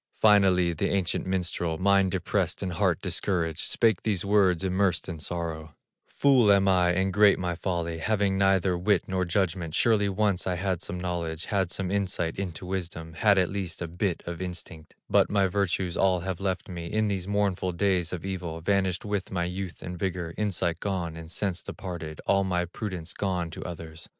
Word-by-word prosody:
Finally 95 Hz, -5 st, +5 dB
the 80 Hz, -, -1 dB
ancient 95 Hz, -2 st, 0 dB
minstrel, 90 Hz, -3 st, -1 dB
Mind 100 Hz, +1 st, +3 dB
depressed, -, -, -1 dB
and 90 Hz, -2 st, -2 dB
heart 80 Hz, -, +1 dB
discouraged, 85 Hz, -4 st, -1 dB
Spake 110 Hz, -2 st, +2 dB
these 105 Hz, -3 st, -1 dB
words, 95 Hz, -4 st, +3 dB
immersed 95 Hz, -2 st, +1 dB
in 85 Hz, -3 st, -5 dB
sorrow: 80 Hz, -2 st, -4 dB, 0.3 s
"Fool 130 Hz, -7 st, +4 dB
am 100 Hz, -1 st, +4 dB
I, 90 Hz, -2 st, +4 dB
and 95 Hz, +1 st, 0 dB
great 105 Hz, 0 st, +6 dB
my 90 Hz, -1 st, -2 dB
folly, 85 Hz, -2 st, -2 dB
Having 100 Hz, 0 st, +1 dB
neither 95 Hz, -1 st, +3 dB
wit 90 Hz, +1 st, +2 dB
nor 95 Hz, -1 st, 0 dB
judgment; 90 Hz, -3 st, -1 dB
Surely 105 Hz, -3 st, +3 dB
once 100 Hz, -2 st, +1 dB
I 90 Hz, -, 0 dB
had 95 Hz, -1 st, -1 dB
some 90 Hz, -2 st, -5 dB
knowledge, 85 Hz, -3 st, -3 dB
Had 95 Hz, -4 st, 0 dB
some 95 Hz, -2 st, -2 dB
insight 95 Hz, -4 st, -1 dB
into 95 Hz, -2 st, -4 dB
wisdom, 85 Hz, -3 st, -5 dB
Had 100 Hz, +3 st, +3 dB
at 90 Hz, -1 st, +2 dB
least 95 Hz, -3 st, -4 dB
a 85 Hz, -, -3 dB
bit 90 Hz, +1 st, -2 dB
of 85 Hz, +1 st, -5 dB
instinct; 85 Hz, -3 st, -7 dB
But -, -, +4 dB
my 100 Hz, -1 st, +3 dB
virtues 95 Hz, -2 st, 0 dB
all 95 Hz, -2 st, +2 dB
have 95 Hz, -1 st, -3 dB
left 95 Hz, -1 st, -2 dB
me 85 Hz, -2 st, -6 dB
In 110 Hz, +4 st, 0 dB
these 95 Hz, -3 st, -2 dB
mournful 100 Hz, -3 st, 0 dB
days 90 Hz, -2 st, +1 dB
of 90 Hz, 0 st, -5 dB
evil, 90 Hz, -4 st, -4 dB
Vanished 95 Hz, +1 st, 0 dB
with 100 Hz, -2 st, -2 dB
my 90 Hz, -3 st, -1 dB
youth 90 Hz, +1 st, -5 dB
and 90 Hz, 0 st, -6 dB
vigor, 90 Hz, -3 st, -2 dB
Insight 90 Hz, -5 st, 0 dB
gone, 90 Hz, -5 st, -2 dB
and 80 Hz, 0 st, -9 dB
sense 90 Hz, 0 st, -1 dB
departed, 85 Hz, -7 st, -7 dB
All 100 Hz, 0 st, +3 dB
my 90 Hz, -2 st, 0 dB
prudence 90 Hz, -2 st, -5 dB
gone 90 Hz, -4 st, -2 dB
to -, -, -7 dB
others! 80 Hz, -1 st, -7 dB
90 Hz, 185 wpm, -27 LUFS, 85-100 Hz, 0.3 s, great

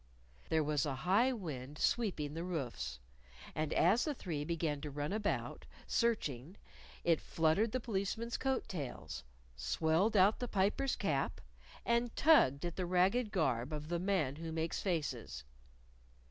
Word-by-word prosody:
There 160 Hz, -1 st, +3 dB
was 145 Hz, -2 st, +1 dB
a 135 Hz, -, -1 dB
high 215 Hz, +8 st, +4 dB
wind 150 Hz, -, -5 dB
sweeping 170 Hz, -12 st, 0 dB
the 165 Hz, +2 st, -4 dB
roofs. 120 Hz, -, -3 dB, 0.6 s
And 155 Hz, 0 st, -2 dB
as 200 Hz, +8 st, +4 dB
the 300 Hz, -2 st, -1 dB
three 160 Hz, -10 st, -3 dB
began 155 Hz, -2 st, -1 dB
to 150 Hz, -, -4 dB
run 145 Hz, +4 st, -3 dB
about, 210 Hz, -1 st, -2 dB, 0.2 s
searching, 180 Hz, -, -1 dB, 0.5 s
it 165 Hz, -2 st, +3 dB
fluttered 165 Hz, +8 st, +2 dB
the 255 Hz, -, 0 dB
Policeman's 225 Hz, +1 st, -2 dB
coat 265 Hz, 0 st, -1 dB
tails, 135 Hz, -, -5 dB, 0.3 s
swelled 160 Hz, -, +1 dB
out 195 Hz, +3 st, +5 dB
the 245 Hz, -, -2 dB
Piper's 210 Hz, +7 st, +1 dB
cap, -, -, -1 dB, 0.5 s
and 235 Hz, 0 st, +1 dB
tugged 175 Hz, -, +5 dB
at 175 Hz, -, -4 dB
the 185 Hz, -, -1 dB
ragged 195 Hz, +6 st, +2 dB
garb 130 Hz, -, 0 dB
of 150 Hz, 0 st, -5 dB
the 170 Hz, 0 st, 0 dB
Man 175 Hz, -7 st, 0 dB
Who 165 Hz, 0 st, -5 dB
Makes 160 Hz, 0 st, -2 dB
Faces. 145 Hz, -, -2 dB
170 Hz, 145 wpm, -35 LUFS, 145-210 Hz, 0.6 s, out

